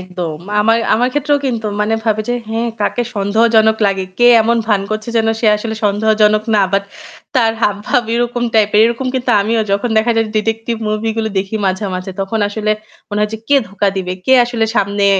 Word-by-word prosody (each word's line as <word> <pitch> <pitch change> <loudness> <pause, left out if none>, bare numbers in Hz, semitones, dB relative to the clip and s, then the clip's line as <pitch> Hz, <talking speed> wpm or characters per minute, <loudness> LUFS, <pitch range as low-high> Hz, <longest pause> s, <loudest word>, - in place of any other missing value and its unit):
একদম। 180 -4 -5 0.2
আমার 225 +2 +3 0.2
আমার 245 +3 +1
ক্ষেত্রেও 290 +1 +1
কিন্তু 230 -4 -2
মানে 210 +1 +1
ভাবে 215 -1 0
যে 245 - +1
হ্যাঁ 225 +1 -2
কাকে 240 +3 0
সন্দেহজনক 220 +2 +3
লাগে। 195 -1 -1
কে 240 - +5 0.2
এমন 235 +1 +1
ভান 210 -3 +2
করছে 215 +1 -4
যেন 225 -1 +2
সে 225 - +1
আসলে 220 +1 -4
সন্দেহজনক 215 +1 +2
না। 205 - +4
বাট 200 0 +1 0.5
তার 225 -3 +3
হাবভাব 205 +4 +1
এরকম 240 0 -1
টাইপ 215 -1 +3
এর - - +6
এরকম 235 +3 -2
কিন্তু 255 -1 -1
আমিও 225 +2 0
যখন 200 +4 0
দেখা 230 +2 +2
যায় 225 0 +2
ডিটেকটিভ 225 +2 -1
মুভি 215 +1 -1
গুলো 220 -1 -1
দেখি 195 +3 -3
মাঝে, 190 +2 -1
মাঝে 185 +1 -5
তখন 195 +3 -2
আসলে 215 +1 -2 0.4
মনে 205 -1 -3
হয় 210 - 0
যে 220 - -6
কে 285 - +5
ধোঁকা 200 +1 0
দিবে? 180 -1 -3
কে 260 - +4
আসলে 240 -2 -1
সামনে 200 -1 +1
220 Hz, 195 wpm, -15 LUFS, 205-230 Hz, 0.5 s, এর